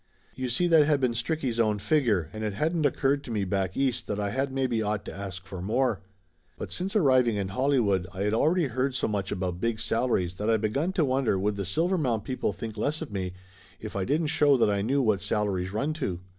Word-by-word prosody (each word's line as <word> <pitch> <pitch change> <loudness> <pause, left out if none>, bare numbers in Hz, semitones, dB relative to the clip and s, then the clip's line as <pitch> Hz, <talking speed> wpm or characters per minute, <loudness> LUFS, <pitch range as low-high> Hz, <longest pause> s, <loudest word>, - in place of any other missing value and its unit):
You 130 -1 -3
see 125 +9 +1
that 160 -4 +5
had 150 -2 +3
been 130 -3 +2
Stricky' 135 +2 -1
s 115 - -4
own 110 -2 +2
figure 105 - +1
and 110 0 -5
it 105 -2 -1
hadn't 155 - +1
oc - - -5
curred 140 +1 +2
to 140 - -11
me 105 -3 -1
back 95 -1 -1
East 130 -4 0
that 105 - -2
I 100 -1 -1
had 135 +4 -1
maybe 130 -4 0
ought 105 -1 -2
to - - -6
ask 95 -1 -7
for 95 -2 -7
more. 110 +2 0 0.6
But - - -6
since 190 +4 -3
arriving 130 - +4
in 100 -2 -2
Hollywood 105 -6 +1
I 95 +1 -4
had 105 +1 +1
al 115 - +3
ready 175 0 +2
heard 130 +1 -1
so - - 0
much 100 -3 -2
about 90 -2 -3
big 115 -1 0
salaries 115 -6 0
that 105 +2 -1
I 115 - +4
begun 125 - 0
to 165 -5 +2
wonder 130 -6 +1
would 100 +2 0
the 100 -1 -3
Silvermount 140 - 0
people 130 -3 -2
think 110 +3 -7
less 155 +7 -1
of 155 - -9
me 95 -2 -3 0.5
if - - -8
I 100 - 0
didn't 150 - 0
show 145 -2 +4
that 110 -4 +3
I 100 -1 0
knew 135 +6 +1
what 105 -4 +2
salaries 100 -3 -1
run 140 +9 -1
to? 90 -8 -2
115 Hz, 240 wpm, -27 LUFS, 100-140 Hz, 0.6 s, that